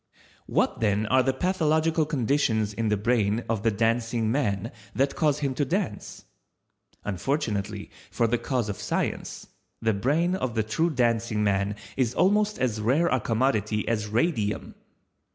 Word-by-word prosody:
What - - +1
then 105 -1 +1
are 130 +4 +4
the 135 +1 +2
pathological 160 0 +1
conditions 120 -6 +1
in 110 +1 -1
the 105 - +2
brain 110 0 +1
of 110 -3 -1
the 115 - +3
Dancing 115 +1 0
man 115 -5 -1 0.2
that 135 +2 +1
cause 150 -2 +1
him 140 -2 0
to 135 - 0
dance? 165 - -3 0.8
Unfortunately 105 - -2 0.2
for 120 - +1
the 115 +1 +1
cause 125 -5 -1
of 105 - -4
Science, - - -3 0.3
the 110 -1 +1
brain 150 - +1
of 130 -11 -2
the 110 - +2
true 160 +11 0
Dancing 115 -5 +1
man 100 0 +1 0.2
is 125 -2 +1
almost 210 +2 +2
as 115 -4 -1
rare 140 +10 +2
a 130 - +2
commodity 110 -2 0
as 105 -2 0
Radium. 110 - -1
115 Hz, 150 wpm, -26 LUFS, 105-140 Hz, 0.8 s, are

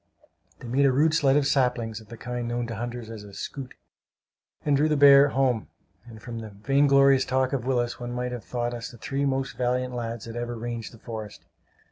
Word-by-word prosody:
They - - -10
made 135 +4 +3
a - - +4
rude 155 +4 +3
sled 145 -3 +4
of 145 - +2
saplings, 120 -5 0
of 110 - -17
the 115 +2 -10
kind 125 0 -4
known 120 0 -2
to 115 -1 -5
hunters 120 0 -5
as 110 -2 -8
a 100 -1 -12
"scoot," 135 -3 -7 0.9
and 145 -2 +3
drew 150 +3 +3
the 150 - +2
bear 140 0 +8
home; 130 -5 0 0.4
and 110 -2 -11
from 115 0 -7
the 110 -1 -7
vainglorious 135 +5 +4
talk 130 +1 0
of 130 -2 -2
Willis 120 -2 0
one 120 0 -5
might 125 0 -3
have 125 -2 -6
thought 120 -1 -3
us 120 -1 -5
the 120 - -13
three 140 +5 -2
most 135 0 -1
valiant 125 0 0
lads 115 -2 -4
that 115 0 -8
ever 120 0 -3
ranged 115 -1 -5
the 115 - -14
forest! 110 -6 -8
125 Hz, 215 wpm, -26 LUFS, 115-135 Hz, 0.9 s, bear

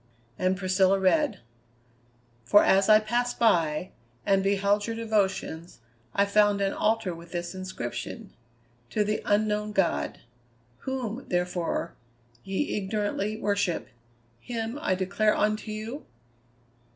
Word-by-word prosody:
And 185 +1 +1
Priscilla 190 0 +3
read: 220 +4 +2 1.0
"'For 205 - +6
as 195 +2 +4
I 215 0 +8
passed 240 +3 -1
by, 170 -6 +2 0.3
and 195 -1 +3
beheld 200 +1 +1
your 230 - -3
devotions, 200 -7 -1 0.4
I 200 - +4
found 205 0 +3
an 195 -1 0
altar 220 -4 0
with 170 +1 -12
this 175 +1 -3
inscription, 185 -10 -6 0.6
To 210 - +1
the 210 +1 -1
Unknown 210 0 +1
God. 195 -4 0 0.6
Whom, 260 -2 -3
therefore, 175 -1 -1 0.5
ye 195 +9 -2
ignorantly 205 +1 -2
worship, 200 -4 -1 0.5
him 230 - -4
I 185 - +1
declare 205 +3 +1
unto 215 +1 0
you?'" 220 +7 -5
205 Hz, 115 wpm, -27 LUFS, 185-215 Hz, 1.0 s, I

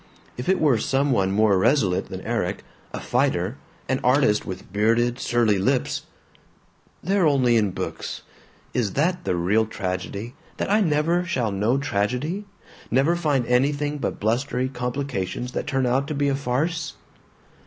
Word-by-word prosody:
If 125 +7 -4
it 190 -1 +3
were 140 -7 +3
some 135 +5 +1
one 95 -6 +2
more 100 -1 +3
resolute 100 -5 +2
than - - -6
Erik, - - -2 0.3
a - - -5
fighter, 95 +9 0 0.3
an 130 0 0
artist 125 -4 +3
with 95 -1 -7
bearded 115 +4 +2
surly 115 -6 +2
lips 130 +6 0 1.0
They're 190 -1 +3
only 130 -5 +3
in 105 -3 +3
books. - - -5 0.5
Is 110 -6 0
that 175 +4 0
the - - +1
real 100 +6 +2
tragedy, 100 +3 -4 0.2
that - - -2
I 215 +1 +4
never 165 +1 +2
shall 130 - -1
know 105 +6 +1
tragedy, 140 - -1 0.4
never 140 +7 +3
find 145 -7 +1
anything 145 +4 +1
but - - -3
blustery 125 +4 0
complications 125 -3 -3
that - - -4
turn 135 -2 +1
out 130 +3 +1
to 155 - -3
be 140 0 +1
a 135 - +1
farce? 145 +5 -2
125 Hz, 155 wpm, -24 LUFS, 110-145 Hz, 1.0 s, I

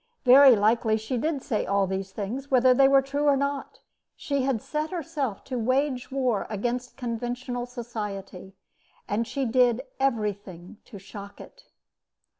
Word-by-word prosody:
Very 265 0 +8
likely 220 +1 +2
she 220 +4 -4
did 285 +2 -1
say 215 - -1
all 200 0 +2
these 190 0 -4
things, 230 +8 -5
whether 255 -1 +5
they 270 +2 +5
were 275 0 +5
true 285 +2 -2
or 280 -1 +4
not. 280 0 -3 0.3
She 280 -2 -2
had 260 -3 0
set 305 +7 -3
herself 305 - -4
to 255 -2 -4
wage 255 +2 0
war 255 -6 0
against 240 +4 -3
conventional 245 +1 -4
society, 210 -6 -7 0.5
and 225 +3 -1
she 275 -1 -2
did 245 0 +2 0.2
everything 205 -8 -2
to 210 - -11
shock 200 +1 -11
it. - - -14
245 Hz, 150 wpm, -26 LUFS, 210-270 Hz, 0.5 s, Very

